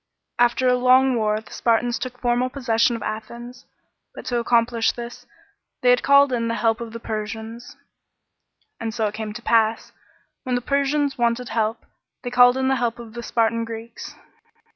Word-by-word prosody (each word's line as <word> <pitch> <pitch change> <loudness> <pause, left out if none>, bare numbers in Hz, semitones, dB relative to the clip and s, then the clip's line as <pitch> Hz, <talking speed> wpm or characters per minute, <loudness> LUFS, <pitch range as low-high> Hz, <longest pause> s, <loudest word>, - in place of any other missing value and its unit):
After 240 +1 +3
a 250 - +4
long 255 +1 +4
war 215 -2 0
the - - -18
Spartans 235 +1 +1
took 250 -1 -6
formal 245 +1 +1
possession 240 -3 +1
of 230 - -6
Athens; 235 +3 -7 0.5
but - - -9
to 240 -1 -1
accomplish 235 -1 +2
this, 240 0 -9 0.6
they 245 - +6
had 245 - +3
called 280 -1 +5
in 230 -1 -1
the 230 - -1
help 225 +1 0
of 230 -1 -6
the 230 - -7
Persians. 220 +2 -6 1.0
And 225 -1 -4
so 225 - 0
it 210 - -2
came 220 -1 -5
to 235 +2 -9
pass, 225 -1 +1 0.5
when 255 -1 -2
the 245 - -1
Persians 280 +1 0
wanted 235 +1 0
help, 220 0 -2 0.4
they 245 - -4
called 245 +1 +6
in 265 0 0
the 265 0 +2
help 240 -1 -1
of 230 -2 -11
the 240 - -6
Spartan 230 0 0
Greeks. 230 0 -8
235 Hz, 180 wpm, -22 LUFS, 225-250 Hz, 1.0 s, they